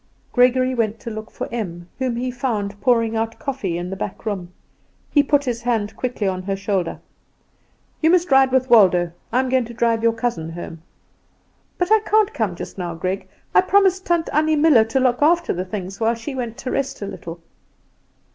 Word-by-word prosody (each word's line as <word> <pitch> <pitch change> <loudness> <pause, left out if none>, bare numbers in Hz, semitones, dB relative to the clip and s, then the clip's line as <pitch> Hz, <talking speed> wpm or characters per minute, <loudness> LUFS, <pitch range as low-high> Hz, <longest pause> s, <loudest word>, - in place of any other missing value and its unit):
Gregory 255 +1 +3
went 225 -2 -1
to 230 - -7
look 215 0 -7
for - - -5
Em, 175 -7 -5
whom 255 -2 -1
he 250 +2 -2
found 210 -5 -3
pouring 230 -2 +2
out 225 0 -2
coffee 235 -11 -3
in 175 +1 -5
the - - -3
back 190 +2 -6
room. 190 -5 -4 0.6
He 290 - +5
put 290 0 +2
his 240 -2 -2
hand 220 -3 -1
quickly 240 -4 -2
on 185 -1 -1
her 195 +1 -2
shoulder. 195 -3 -2 1.0
"You 320 - +4
must 350 -2 +3
ride 265 -1 +5
with 260 0 +2
Waldo; 185 -7 +5 0.2
I 250 - +2
am 260 - +1
going 255 -1 +2
to 235 +1 -10
drive 230 -1 +1
your 230 0 +3
cousin 225 -9 -2
home." 165 -1 -8 1.0
"But 360 +3 -1
I 440 - +7
can't 430 -1 +2
come 210 -6 -1
just 180 - -8
now, 175 -2 -4
Greg; 185 +4 -3 0.3
I - - +7
promised 380 0 +3
Tant 345 -2 +1
Annie 310 +1 +3
Muller 295 -7 +5
to 225 +4 0
look 250 -1 +1
after 340 +3 +3
the 180 +1 -3
things 195 -1 -6
while 230 +1 +2
she 230 +5 -6
went 240 -3 -4
to 255 - -5
rest 275 -6 -2
a - - -2
little." 175 -4 -8
230 Hz, 200 wpm, -21 LUFS, 195-265 Hz, 1.0 s, I